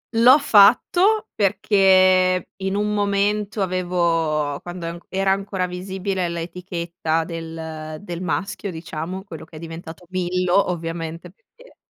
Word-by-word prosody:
L'ho 245 +5 +7
fatto 330 - +4
perché 185 -2 +3
in 190 0 -2
un 210 +1 0
momento 205 0 0
avevo 165 -5 0
quando 175 -1 -7
an 170 +1 -5
era 195 0 +1
ancora 195 -1 -1
visibile 185 0 -3
l'etichetta 170 -1 -3
del 160 -2 -7
del 175 -4 -7
maschio, 190 +4 -3
diciamo, 165 +2 -6
quello 165 -6 -9
che 160 - -16
è - - -8
diventato 165 +1 -9
Millo, 185 +1 +1
ovviamente, 165 0 -5
perché - - -22
180 Hz, 120 wpm, -22 LUFS, 165-195 Hz, -, L'ho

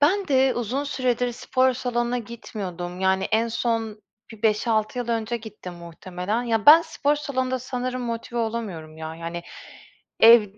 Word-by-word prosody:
Ben 370 +5 +3
de, 265 -1 +4
uzun 245 +5 -2
süredir 250 -3 0
spor 255 +1 +1
salonuna 245 -1 -1
gitmiyordum. 185 -6 -6
Yani 190 0 +2
en 225 +2 +1
son 225 -2 -2 0.3
bir 225 0 -14
5-6 220 +2 +1
yıl 240 -1 -3
önce 230 0 -1
gittim 210 -5 -9
muhtemelen. 180 +6 -4
Ya, 225 -1 -1
ben 320 +3 +10
spor 295 -3 0
salonunda 260 -3 -1
sanırım 255 0 -3
motive 235 0 -4
olamıyorum, 210 -9 -4
ya. 160 0 -6
Yani 170 +1 -6 0.8
ev 230 -1 +9
230 Hz, 145 wpm, -24 LUFS, 210-255 Hz, 0.8 s, ben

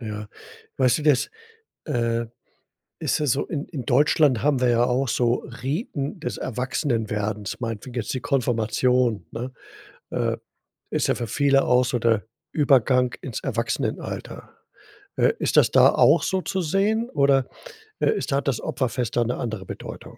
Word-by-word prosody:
Ja. 105 -2 -6 0.5
Weißt 130 0 +3
du, 150 - -5
das, 145 -4 +3 0.5
äh, 115 -1 -1 0.7
ist - - 0
ja 150 - 0
so, 140 +1 +1
in 150 -3 -3
in 140 -7 -6
Deutschland 140 -1 +3
haben 145 -3 +2
wir 125 - +3
ja 120 0 +3
auch 130 +2 0
so 120 0 +1 0.2
Riten 145 - -3
des 125 -9 -4
Erwachsenwerdens, 110 - -2
meinetwegen 115 +1 -5
jetzt 115 -4 -2
die 130 - -3
Konfirmation, 120 - +1
ne, 125 +3 -5 0.6
äh, - - 0 0.5
ist - - 0
ja - - +2
für 120 - -4
viele 135 +3 +3
auch 125 0 +4
so 125 0 0
der 115 -2 +1 0.3
Übergang 130 -3 +3
ins 125 -5 -5
Erwachsenenalter. - - -3 0.6
Äh, - - +3
ist - - 0
das - - +5
da - - +7
auch 160 +4 +4
so 190 -1 0
zu 190 +1 -2
sehen 210 +8 +1
oder, 140 -2 +3 0.5
äh, - - +3
ist 425 - -3
hat 140 +1 0
das 135 -4 +1
Opferfest 125 -2 -2
da 120 - +4
'ne 120 +2 -2
andere 110 -5 -4
Bedeutung? - - -9
125 Hz, 160 wpm, -24 LUFS, 115-140 Hz, 0.7 s, da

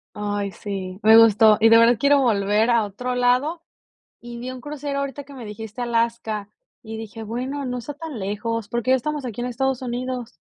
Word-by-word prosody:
Ay, 205 -1 -2
sí, 190 -2 -6
me 220 +1 +8
gustó, 220 -1 +7
y 225 - +6
de 230 - +7
verdad 230 +1 +5
quiero 280 +4 +4
volver 210 -1 +2
a 235 -2 +4
otro 250 +5 -4
lado, 255 +7 +1 0.6
y 235 0 -9
vi 250 +2 -5
un 255 0 -7
crucero 285 0 -4
ahorita 280 +1 -4
que 280 0 -13
me 240 -4 -8
dijiste 220 +3 -7
Alaska 230 -3 -1 0.3
y 220 -1 -8
dije: 225 0 -8
"Bueno, 255 +6 -4
no 250 -1 -3
está 265 +4 -6
tan 305 -2 -7
lejos, 210 +3 -3
porque 240 +2 -2
ya 260 - +6
estamos 295 +2 -4
aquí 240 -1 -5
en 245 - -2
Estados 260 +1 -1
Unidos". 245 0 -4
235 Hz, 200 wpm, -22 LUFS, 220-255 Hz, 0.6 s, me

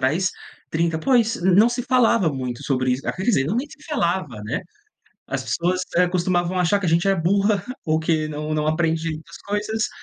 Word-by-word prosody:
atrás, 160 +8 +1 0.4
30, 165 0 0
pois, 230 +3 +2
não 190 +5 +5
se 240 +1 -2
falava 230 - +3
muito 125 -2 -4
sobre 130 -2 0
isso, 130 +2 -2
quer 185 - -3
dizer, 195 - +2
não 160 - -1
nem 265 +5 -2
se 305 - -15
falava, 170 - -1
né. 110 - -2 0.7
As - - -3
pessoas, 180 +2 0
eh, 180 +1 +4
costumavam 180 0 0
achar 180 +3 +2
que 200 - -3
a - - +2
gente 170 +3 +2
é 195 - +4
burra, 195 +3 +2 0.2
ou 155 -1 +2
que 160 -1 0
não 150 0 -4
não 150 0 0
aprende 160 +1 0
muitas 160 +1 -8
coisas, 210 +2 -1
175 Hz, 200 wpm, -22 LUFS, 155-200 Hz, 0.7 s, não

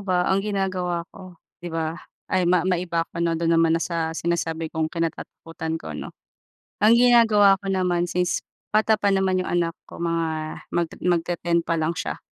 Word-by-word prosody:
ba 180 -2 +1
ang 190 +1 +2
ginagawa 185 -4 -2
ko, 185 -2 -12 0.2
'di 175 - -6
ba 165 0 -2 0.4
ay 185 - +3
ma 180 -1 +3
maiba 175 -2 0
ako 170 - -7
'no, 165 -1 +1
do'n 165 0 +1
naman 165 0 +4
na - - -2
sa 165 -2 -1
sinasabi 165 -1 -1
kong 160 -1 0
kinatatakutan 165 -1 -4
ko - - -8
'no. - - -6 0.7
Ang 215 +2 +7
ginagawa 225 -5 +6
ko - - -8
naman 180 -2 +1
since 180 0 0 0.3
bata 220 0 +4
pa 200 - +2
naman 190 -1 +1
yung 185 - -3
anak 170 -1 +1 0.2
ko - - -11
mga 165 -1 0 0.5
magte 170 -1 0
magte-10 170 -1 +1
pa 165 - 0
lang 160 +2 0
siya. - - -4
175 Hz, 180 wpm, -24 LUFS, 165-185 Hz, 0.7 s, Ang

